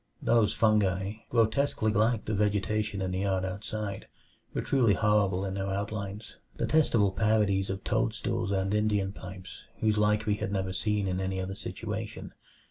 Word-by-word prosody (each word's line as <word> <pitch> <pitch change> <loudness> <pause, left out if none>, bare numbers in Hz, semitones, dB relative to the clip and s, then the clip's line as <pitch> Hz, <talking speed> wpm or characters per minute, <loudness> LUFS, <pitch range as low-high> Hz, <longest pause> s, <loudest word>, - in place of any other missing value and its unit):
Those 115 -3 +3
fungi, 100 -2 +2
grotesquely 115 0 +2
like 110 +2 +2
the 110 - -2
vegetation 105 0 0
in 95 - -2
the 95 - -2
yard 95 -1 0
outside, 100 +1 -5 0.4
were - - -2
truly 120 -7 +3
horrible 100 -2 +2
in 95 - -3
their 95 0 -2
outlines; 100 +1 -4 0.2
detestable 120 -10 +3
parodies 105 -2 +2
of 95 0 -4
toadstools 95 - -1
and 95 0 0
Indian 105 -2 +1
pipes, 95 -1 -9 0.2
whose 110 -1 +2
like 105 +1 +2
we 105 -1 +1
had 95 - -3
never 95 -2 -1
seen 105 0 0
in 90 0 -1
any 95 0 -2
other 95 +1 -3
situation. 105 - -5
100 Hz, 155 wpm, -29 LUFS, 95-110 Hz, 0.4 s, Those